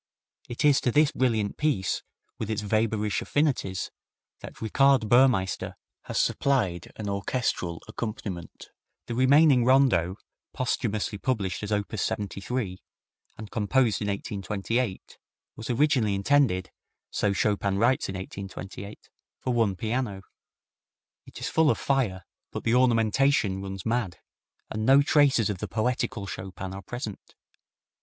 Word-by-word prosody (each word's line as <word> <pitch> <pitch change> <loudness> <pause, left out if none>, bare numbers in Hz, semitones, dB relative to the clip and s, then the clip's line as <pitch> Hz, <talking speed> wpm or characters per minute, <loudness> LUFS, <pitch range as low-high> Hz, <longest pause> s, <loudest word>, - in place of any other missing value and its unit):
It 120 +4 -2
is 145 -2 +5
to 125 - +1
this 150 +3 +4
brilliant 115 -7 0
piece, 145 -11 0 0.4
with 110 - -3
its 110 -1 -2
Weber 110 0 +1
ish 105 - -1
affinities, 135 - 0 0.5
that - - -10
Richard 130 +1 +3
Burmeister 120 -5 +3 0.3
has - - -4
supplied 105 -12 +1
an 105 - -5
orchestral 100 -4 -2
accompaniment. 105 -6 -6 0.4
The - - -4
remaining 130 +1 +5
Rondo, 125 -9 +3 0.4
posthumously 110 -5 -1
published 100 -9 -1
as 105 0 -5
op. 105 +1 -1
73, 100 0 -3 0.6
and 110 -2 -9
composed 115 +2 +1
in 105 - -1
1828, 100 +2 -3 0.4
was 110 - -8
originally 125 -5 +2
intended, 100 -4 +2 0.4
so 105 - +1
Chopin 100 -1 0
writes 120 +2 +2
in 95 - -4
1828, 95 +1 -8 0.3
for 125 - -1
one 110 -5 +2
piano. 110 -2 -2 1.0
It - - -11
is - - -3
full 160 -1 +3
of - - +2
fire, 115 -10 0 0.3
but - - -5
the 115 - +1
ornamentation 115 -3 +3
runs 95 -1 -6
mad, 110 -7 -1 0.5
and 110 0 -2
no 135 +4 +6
traces 140 -8 +3
of 95 - -6
the 105 - -4
poetical 110 0 -1
Chopin 95 0 -6
are 95 - -7
present. 110 +1 -7
110 Hz, 130 wpm, -27 LUFS, 100-130 Hz, 1.0 s, no